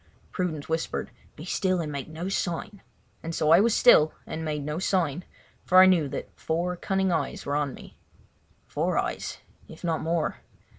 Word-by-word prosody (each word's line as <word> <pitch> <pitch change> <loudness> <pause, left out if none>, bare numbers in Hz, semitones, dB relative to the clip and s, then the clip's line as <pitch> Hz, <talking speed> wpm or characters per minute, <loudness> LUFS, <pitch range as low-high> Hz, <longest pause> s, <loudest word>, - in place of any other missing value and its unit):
Prudence 165 -6 -3
whispered: 160 0 -2 0.2
"Be 155 - -9
still 185 0 0
and 155 -3 -3
make 140 -2 -5
no 160 +3 -6
sign," 195 +1 -3 0.4
and 165 0 -5
so 155 - +2
I 170 - +8
was 225 +2 +3
still 155 -11 +6
and 160 - -5
made 150 -2 -2
no 150 +2 -3
sign, 180 -4 0 0.4
for 185 - +3
I 185 - +10
knew 175 -6 +4
that - - -6
four 175 +3 -2
cunning 190 +1 0
eyes - - -2
were 145 - -1
on 145 -3 -1
me. - - -14 0.7
"Four - - -1
eyes—if 160 - -5
not 165 -2 0
more." 165 0 -1
165 Hz, 175 wpm, -26 LUFS, 155-185 Hz, 0.7 s, I